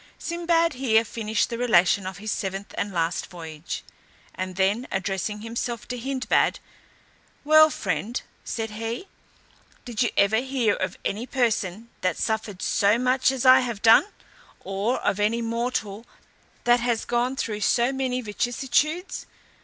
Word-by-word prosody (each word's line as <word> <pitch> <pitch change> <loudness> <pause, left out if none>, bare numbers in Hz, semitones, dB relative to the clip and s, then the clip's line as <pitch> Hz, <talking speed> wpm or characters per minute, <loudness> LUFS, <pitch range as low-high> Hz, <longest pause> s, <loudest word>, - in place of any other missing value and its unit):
Sinbad 335 -1 +1
here 230 -4 +2
finished 220 0 -1
the 235 - -3
relation 195 -5 +3
of 190 -2 -6
his 215 +2 -4
seventh 195 0 -4
and 205 - -2
last 170 -1 -1
voyage, 165 -2 -7 0.5
and 185 0 -5
then 200 +6 +1
addressing 195 +2 -2
himself 235 +1 -4
to 250 - -2
Hindbad, 260 +1 +1 0.9
"Well, 310 +1 +7
friend," 200 - -2 0.2
said 225 -1 -4
he, 225 - -5 0.8
"did 240 -1 -3
you 240 - +3
ever 200 +2 +4
hear 250 -3 +1
of 185 - -3
any 225 +5 -2
person 230 -4 -1
that 180 -3 0
suffered 220 -3 -2
so 205 +2 +3
much 255 +1 +2
as 265 -1 -3
I 255 0 +9
have 235 -5 -4
done, 225 +9 +7 0.6
or 200 +6 -1
of 200 - 0
any 225 +3 +1
mortal 230 -2 -3 0.6
that 240 0 +4
has 235 -2 0
gone 245 +2 0
through 210 -5 -3
so 235 +4 +3
many 260 -1 -1
vicissitudes? 255 - -1
230 Hz, 145 wpm, -25 LUFS, 200-250 Hz, 0.9 s, I